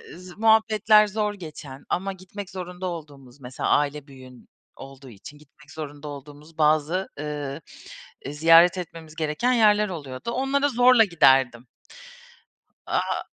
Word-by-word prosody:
z 180 +1 -13
muhabbetler 220 -1 +4
zor 210 0 -2
geçen 150 -7 -11
ama 195 +2 -2
gitmek 190 +1 -10
zorunda 180 -1 -7
olduğumuz, 145 -6 -10
mesela 125 0 -5
aile 145 0 0
büyüğün 130 -2 -15 0.3
olduğu 135 0 -13
için 115 +7 -13
gitmek 150 0 -21
zorunda 150 -1 -8
olduğumuz 145 +3 -12
bazı, 155 +4 +1
ııı, 145 -1 -5 0.6
e, 140 - -7
ziyaret 165 +4 +5
etmemiz 165 -3 -9
gereken 160 +10 -1
yerler 210 -3 +3
oluyordu. 145 - -7
Onlara 275 +3 0
zorla 245 -1 +5
giderdim. 130 - +2 1.2
Aaa - - -1
160 Hz, 125 wpm, -24 LUFS, 145-195 Hz, 1.2 s, ziyaret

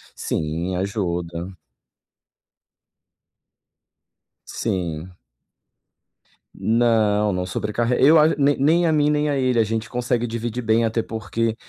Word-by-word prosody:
Sim, 80 +4 -3
ajuda. 90 -2 -3 2.9
Sim. 90 -1 -4 1.4
Não, 110 -3 +2
não 90 0 -2
sobrecarreg 115 +7 -1
eu 155 +3 +7
a 155 - +6
nem 145 0 +2
nem 165 +5 +3
a - - +2
mim 150 -1 +2
nem 150 0 +1
a 140 - 0
ele, 130 -2 +1
a - - +5
gente 110 +1 -3
consegue 120 -1 -1
dividir 115 +1 -4
bem, 115 +1 +2
até 110 0 -1
porque 115 0 -3
115 Hz, 115 wpm, -22 LUFS, 95-125 Hz, 2.9 s, eu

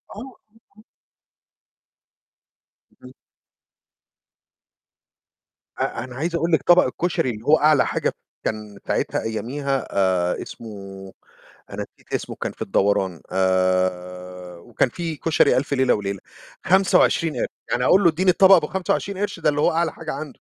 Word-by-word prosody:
آه، 255 +5 -9 0.4
آه. 215 - -18 2.2
امم. 125 - -12 2.7
أ - - -2
أنا 125 -1 -10
عايز 165 +5 -2
أقول 170 +1 0
لِك 160 - +2
طبق 175 +1 +6
الكشري 130 0 -1
اللي 110 -1 -6
هو 155 +2 +5
أعلى 150 -3 +4
حاجة - - -1 0.3
كان 105 -2 -4
ساعتها - - -1
أياميها 135 +5 -3
آآ 90 -2 +1
اسمه، 115 - -9 1.0
أنا - - -5
نسيت - - -22
اسمه - - -3
كان - - -3
في - - -9
الدوران، 95 -3 0
آآ 90 -1 -1
وكان 120 +7 -1
في 165 +3 -5
كشري 145 -4 +2
ألف 140 +3 -1
ليلة 130 -2 +3
وليلة، 100 -1 -3 0.5
25 180 -3 +3
قِرش. - - 0 0.2
يعني 125 +1 0
أقول 195 +8 +5
له - - +7
اديني 185 +4 +2
الطبق 190 +2 +7
أبو 160 -4 +3
25 190 +1 -2
قِرش 205 -4 -3
ده 160 - +1
اللي 145 0 -2
هو - - +3
أعلى 165 0 0
حاجة 160 -1 -6
عنده. 140 -1 -7
135 Hz, 140 wpm, -22 LUFS, -, 2.7 s, له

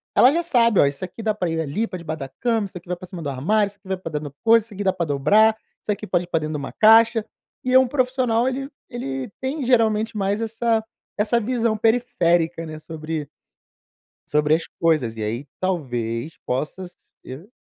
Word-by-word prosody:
ela 255 - +7
já 340 +3 0
sabe: 235 - +3
"Ó, - - +7
isso 140 +5 -2
aqui 200 +4 -7
dá 215 -1 +1
pra 180 -5 -2
ir 165 0 -1
ali 160 +10 -1
pra 185 - -6
debaixo 160 -2 -5
da 135 -1 -6
cama, 225 - -1
isso 190 - -10
aqui 175 0 -13
vai 180 - -2
pra 185 - -10
cima 175 -2 -8
do 145 - -2
armário, 200 +11 +1
isso 200 - -17
aqui 195 - -20
vai 190 -1 -1
pra 165 -3 -7
dentro 150 -1 -3
do 140 - -25
coisa, 230 0 +6
isso 225 - -12
aqui 205 +1 -4
dá 190 - +2
pra 175 -2 -2
dobrar, 205 +11 +4 0.2
isso - - -2
aqui 205 - -3
pode 175 -1 0
ir - - -24
pra 165 - 0
dentro 155 0 -3
de - - -2
uma 140 - -6
caixa.". 225 0 +6 0.4
E 255 0 0
é 260 - +9
um 260 - +3
profissional, 255 -2 +1
ele 270 +1 -2 0.2
ele 135 - -4
tem 270 +3 -2
geralmente 225 -3 +2
mais 200 0 0
essa 225 0 0 0.3
essa 210 +3 +2
visão 230 -1 0
periférica, 175 -8 +1
né, 155 -1 -7
sobre 155 -1 -5 1.0
sobre 150 0 +2
as 165 - -1
coisas. 155 -9 +2
E 110 - -4
aí 115 +7 -3
talvez 125 -7 -2
possa 155 +8 -3 0.3
ser 150 - -10
190 Hz, 220 wpm, -22 LUFS, 155-225 Hz, 1.0 s, é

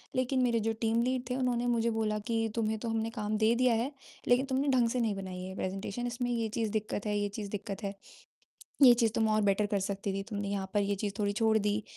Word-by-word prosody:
लेकिन 255 +1 +1
मेरे 235 -2 +2
जो 225 +1 0
टीम 225 0 +2
लीड 255 0 0
थे, 250 - -1
उन्होंने 245 -2 0
मुझे 235 -1 +2
बोला 220 -1 0
कि 225 -1 0
तुम्हें 220 -1 0
तो 230 +1 -4
हमने 225 0 -1
काम 215 -2 -2
दे 220 +1 +4
दिया 250 -1 +3
है, 240 +5 -1 0.4
लेकिन 250 +2 +4
तुमने 270 +1 0
ढंग 245 -3 +3
से 250 - -1
नहीं 225 -4 +1
बनाई 185 -2 -6
है 190 +1 -6
प्रेज़ेंटेशन 195 +5 -3
इसमें 245 0 -2
ये 230 -2 0
चीज़ 220 -2 0
दिक्कत 215 -1 -2
है 210 0 0
ये 205 0 0
चीज़ 205 -2 -5
दिक्कत 205 0 -5
है। 200 0 -2 0.9
ये 250 -3 +10
चीज़ 230 -2 +2
तुम 220 -1 +2
और 215 - +2
बेटर 205 +2 +1
कर 200 - +2
सकती 200 0 -3
थी, 195 - -2
तुमने 205 -2 -3
यहाँ 195 -1 -3
पर 205 - +4
ये 200 0 0
चीज़ 200 -1 -2
थोड़ी 205 -1 +1
छोड़ 220 +1 +2
दी। 210 0 0
220 Hz, 250 wpm, -31 LUFS, 205-240 Hz, 0.9 s, ये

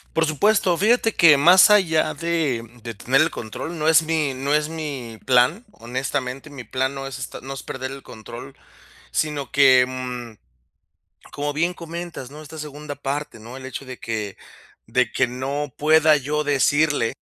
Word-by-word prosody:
Por 160 0 +3
supuesto, 180 +3 +2
fíjate 225 +2 +2
que 155 -4 +7
más 180 +8 +7
allá 160 -6 +3
de, 155 -7 -1
mm, 120 +1 -20
de 115 -2 -6
tener 130 +6 +1
el 160 +1 +3
control, 155 +9 -6
no 155 - -1
es 160 0 +6
mi 155 -4 -1
no 140 +2 -2
es 150 0 +1
mi 140 -8 -6
plan, 130 - +3
honestamente, 130 +3 -4
mi 130 -4 -9
plan 130 +1 -2
no 135 0 -5
es 135 -1 -7
est 125 - -7
no 135 +1 -6
es - - -7
perder 130 0 -6
el 135 - -9
control, 110 -3 -11 0.5
sino 145 -4 -2
que, 130 -2 +6
mm, 125 -3 -6 1.0
como 145 +1 -2
bien 170 +4 0
comentas, 170 -5 -7
¿no?, 150 +1 -10
esta 155 +1 -11
segunda 150 -1 -7
parte, 145 -2 -4
¿no? 120 +4 -10
El 130 - -9
hecho 135 +1 -6
de 130 -1 -9
que 105 -3 -4 0.5
de 115 0 +1
que - - +1
no 135 +3 -4
pueda 155 0 +5
yo 150 +3 -2
decirle 145 -3 +2
140 Hz, 175 wpm, -22 LUFS, 130-155 Hz, 1.0 s, que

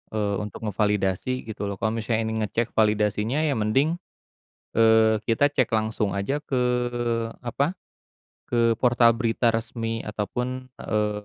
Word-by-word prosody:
Eee, 105 -2 0
untuk 105 +1 -7
ngevalidasi 105 +3 0
gitu 110 -2 -5
loh. 100 - -3
Kalo 110 +3 -1
misalnya 115 0 -1
ini 110 0 -2
ngecek 110 +2 -1
validasinya 105 +5 +1
ya 155 - +2
mending, 135 +9 +1 0.8
eee, 110 -1 +5
kita 145 +6 +3
cek 130 -4 +2
langsung 110 -2 0
aja 100 +9 -1
ke 135 -4 -1 0.8
apa, 140 +8 -1 0.7
ke 115 -1 +2
portal 120 -1 +4
berita 115 0 +1
resmi 115 0 -2
ataupun, 125 +5 -4
eee, 105 -1 -2
115 Hz, 135 wpm, -25 LUFS, 105-125 Hz, 0.8 s, eee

